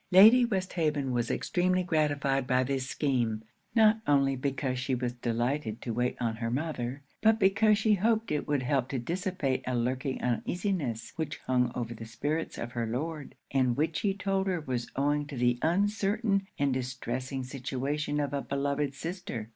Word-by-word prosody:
Lady 220 +7 +8
Westhaven 165 - -1
was 120 -1 0
extremely 185 +1 +1
gratified 145 -5 +1
by 130 +1 +3
this 130 0 -2
scheme; 120 -7 0 0.3
not 220 -1 +6
only 140 -1 +3
because 130 -1 -2
she 130 +1 0
was 125 -1 -2
delighted 120 0 -1
to 115 - -4
wait 125 +2 0
on 115 -2 -1
her 115 0 -2
mother, 135 -1 -3 0.2
but 220 0 +5
because 210 +2 +4
she 220 0 +3
hoped 220 +2 +1
it 150 - -1
would 145 -3 +1
help 130 0 +1
to 135 - -2
dissipate 170 - -1
a 130 - 0
lurking 130 +3 -1
uneasiness 135 - -1
which 160 -2 -3
hung 125 -2 +2
over 120 -1 -3
the 115 0 -9
spirits 150 +8 -2
of 120 - -5
her 115 -2 -2
Lord, 150 +5 -4 0.2
and 130 -3 +2
which 155 +2 0
he 195 -2 0
told 195 -1 0
her 180 -2 0
was 125 -5 -3
owing 145 +1 +1
to 145 -3 -7
the 120 0 +2
uncertain 200 +3 +1
and 140 -2 +2
distressing 130 +1 -3
situation 140 +3 -2
of 145 -1 -1
a 140 - 0
beloved 140 0 -1
sister. 160 - -5
140 Hz, 170 wpm, -29 LUFS, 125-175 Hz, 0.3 s, Lady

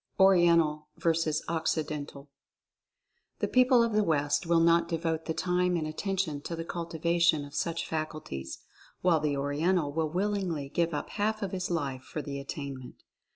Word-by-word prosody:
ORIENTAL 170 -5 +4
VS. 165 -2 +1
OCCIDENTAL. 155 -3 -2 1.1
The - - -1
people 255 -1 +5
of 230 -1 0
the 215 0 +3
West 145 -1 +1
will 170 0 +4
not 170 +1 +4
devote 165 -1 -2
the 160 - -1
time 180 0 +1
and 160 - -2
attention 160 -1 -2
to 170 - -5
the 165 0 -5
cultivation 170 -2 +1
of 145 - -13
such 165 +2 -2
faculties, 155 - -5 0.4
while 175 -3 +4
the 150 -2 0
Oriental 145 +3 +1
will 160 0 0
willingly 180 -5 -1
give 170 +1 0
up 145 - -4
half 215 +1 -1
of 195 - -3
his 185 -1 -3
life 140 -7 -2
for 150 +3 -6
the 140 -1 -5
attainment. 140 -2 -7
165 Hz, 155 wpm, -29 LUFS, 150-180 Hz, 1.1 s, people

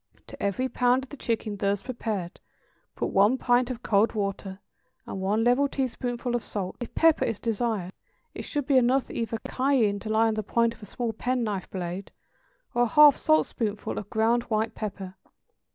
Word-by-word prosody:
To - - -12
every 200 +6 0
pound 250 0 +2
of 265 - -11
the - - -7
chicken 225 -5 -2
thus 200 0 0
prepared 210 -6 -4 0.6
put - - -2
one 205 +6 +4
pint 245 0 +2
of 250 -1 -6
cold 210 +1 +3
water 195 -2 -3 0.5
and 190 - -6
one 210 +4 +1
level 250 +4 +3
teaspoonful 250 -2 -3
of 240 - 0
salt; 195 -4 -4
if 240 - -7
pepper 325 -1 +4
is 225 - -1
desired 220 -5 -2 0.4
it - - -6
should 290 -3 -3
be 275 -1 +3
either - - +8
enough 255 +2 +1 0.3
cayenne 255 -7 +1
to 215 - -7
lie 220 +1 +3
on 220 - +1
the 215 - -1
point 230 +2 +1
of 235 - -20
a 210 - -9
small 235 +2 -3
pen 250 +2 -1
knife 205 -4 -3
blade, 180 +1 -5 0.6
or 240 - +1
a 240 - +4
half 295 +2 +7
saltspoonful 225 -9 0
of 205 - -10
ground 225 +2 +2
white 220 0 0
pepper. 195 -3 -6
225 Hz, 185 wpm, -26 LUFS, 205-250 Hz, 0.6 s, either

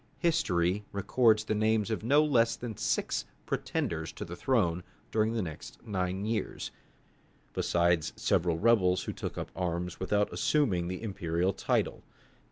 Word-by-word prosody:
History 105 - +1
records 110 +2 +3
the 110 - -1
names 110 0 +1
of 110 - -1
no 145 +6 +5
less 115 -5 +3
than 115 -2 -6
six 110 +1 -1 0.2
pretenders - - -2
to - - -6
the 85 - -7
throne 90 -8 +1 0.3
during 110 +1 +2
the 115 -3 0
next 80 -4 -8
nine 95 -2 -2
years, 110 -2 -2 0.8
besides 85 -2 +2
several 85 -1 +1
rebels 95 -3 +3
who - - -4
took - - -5
up - - -5
arms 90 -1 -2
without 105 +2 +1
assuming 100 - +1
the 90 +4 -5
imperial 90 -3 0
title. - - 0
100 Hz, 145 wpm, -30 LUFS, 90-115 Hz, 0.8 s, no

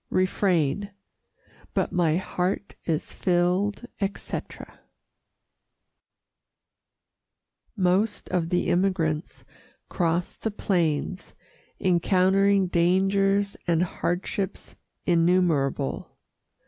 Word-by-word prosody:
Refrain 185 -1 +1 0.9
But - - 0
my 170 -3 +2
heart 185 +2 -2
is 160 -2 -2
filled, 185 +5 +1
etc. 200 -1 -5 3.0
Most 195 +3 +1
of 175 -3 0
the 180 0 0
emigrants 175 -4 0 0.5
crossed 170 0 -1
the 220 - 0
plains, 180 -3 -1 0.4
encountering 190 +2 +3
dangers 195 +3 +2
and 170 0 +3
hardships 180 +2 -3 0.3
innumerable. 165 -6 +1
180 Hz, 70 wpm, -26 LUFS, 170-195 Hz, 3.0 s, encountering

